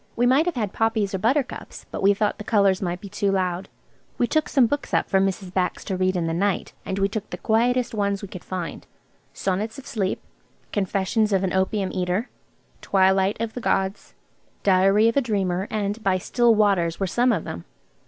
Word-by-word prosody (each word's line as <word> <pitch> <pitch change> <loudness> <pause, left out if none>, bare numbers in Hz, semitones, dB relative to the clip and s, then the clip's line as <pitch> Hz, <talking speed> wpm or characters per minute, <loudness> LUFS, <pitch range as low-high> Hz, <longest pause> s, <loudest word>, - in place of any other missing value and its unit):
We 240 - +2
might 270 +7 +4
have 355 - -1
had 210 -5 -2
poppies 225 -3 0
or 190 - -1
buttercups, 260 +6 -1
but - - -4
we 200 +1 +4
thought 210 +1 0
the - - -5
colours 200 -3 +2
might 175 -1 -3
be 200 - -8
too 200 0 -1
loud. 185 -1 -1 0.5
We - - +2
took 310 +5 0
some 265 -4 +4
books 290 +5 -2
up - - +1
for 195 - +2
Mrs. 190 -1 -1
Bax 185 -1 -1
to 190 - -3
read 185 0 +1
in 175 -2 0
the 165 - -1
night. 195 +2 -1
And 190 - -2
we 195 0 +2
took 210 0 -5
the - - -5
quietest 240 +2 +1
ones 200 -1 -1
we - - -4
could 185 -2 -9
find. 180 -3 -5 0.4
"Sonnets 205 +6 -2
on 275 - -10
Sleep," 200 -8 -2 0.5
"Confessions 205 +2 0
of 195 -1 +2
an 185 - -1
Opium 190 +1 0
Eater," 185 +6 -1 0.5
"Twilight 190 +1 +2
of 230 -1 -3
the 250 - -6
Gods," 195 -2 -1 0.5
"Diary 195 +3 +4
of 230 - +1
a - - +5
Dreamer," 195 -5 -1
and 210 +1 -2
"By 190 -1 +2
Still 235 +5 +2
Waters," 195 -6 +2
were 195 - +1
some 245 +7 +2
of 175 -8 0
them. 85 +1 -7
200 Hz, 205 wpm, -24 LUFS, 190-225 Hz, 0.5 s, a